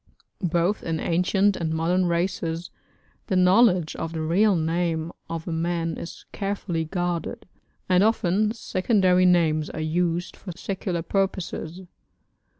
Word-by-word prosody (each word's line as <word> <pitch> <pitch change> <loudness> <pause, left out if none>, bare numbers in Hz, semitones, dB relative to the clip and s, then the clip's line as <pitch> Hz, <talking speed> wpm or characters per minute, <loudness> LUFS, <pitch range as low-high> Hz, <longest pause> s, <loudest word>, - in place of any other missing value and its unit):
Both 175 +3 +1
in 165 -1 -2
ancient 190 +4 +2
and 160 -1 -2
modern 175 +3 +1
races 170 -1 -2 0.6
the 190 - 0
knowledge 185 -2 +4
of 165 - -4
the 160 - -3
real 190 +6 +3
name 165 0 -1 0.2
of 165 0 -5
a - - -2
man 165 0 -1
is 170 - -9
carefully 195 -5 -2
guarded, 175 -1 -3 0.4
and 185 +1 +4
often 210 -1 +2
secondary 185 -4 +2
names 160 -4 +3
are - - -6
used 170 +2 -1
for 180 - -8
secular 185 -4 -3
purposes. 185 -2 -2
175 Hz, 130 wpm, -25 LUFS, 165-190 Hz, 0.6 s, knowledge